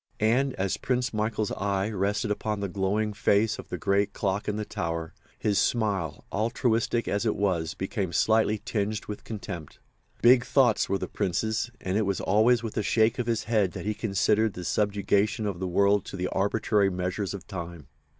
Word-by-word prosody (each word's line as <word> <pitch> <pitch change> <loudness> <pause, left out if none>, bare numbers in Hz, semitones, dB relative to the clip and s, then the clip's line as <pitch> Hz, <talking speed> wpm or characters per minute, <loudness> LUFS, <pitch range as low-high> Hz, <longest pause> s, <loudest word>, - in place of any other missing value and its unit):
And 125 +5 +2
as 95 0 -1
Prince 125 -2 -1
Michael's 110 0 -1
eye 100 0 -1
rested 105 +2 -1
upon 105 0 -2
the 100 - -2
glowing 100 +3 -1
face 105 0 +2
of - - -9
the - - -3
great 100 +1 +1
clock 100 0 -1
in 105 - 0
the 105 0 -3
tower, 80 -3 -4 0.2
his 105 -2 +1
smile, 100 -10 0
altruistic 115 +2 0
as 100 +2 0
it 110 - +1
was, 90 -5 0
became 95 -1 -3
slightly 110 +2 +2
tinged 105 -1 -2
with 105 - -7
contempt. 90 -8 -7 0.5
Big 125 +1 +7
thoughts 125 -7 +3
were 100 - +1
the - - -4
Prince's; 110 +6 -1
and 95 +3 -1
it 110 - +1
was 100 - 0
always 110 +4 +3
with 115 - -5
a - - +2
shake 110 +3 +2
of 120 - -1
his 115 -2 0
head 105 -6 +1
that - - -6
he 105 - 0
considered 105 +1 +1
the 90 - -7
subjugation 105 +2 +1
of 100 -4 -3
the 95 - -2
world 100 +2 +3
to - - -7
the 90 0 -2
arbitrary 100 0 +1
measures 90 +2 -2
of 100 - -9
Time. 85 -5 -7
105 Hz, 190 wpm, -27 LUFS, 95-110 Hz, 0.5 s, Big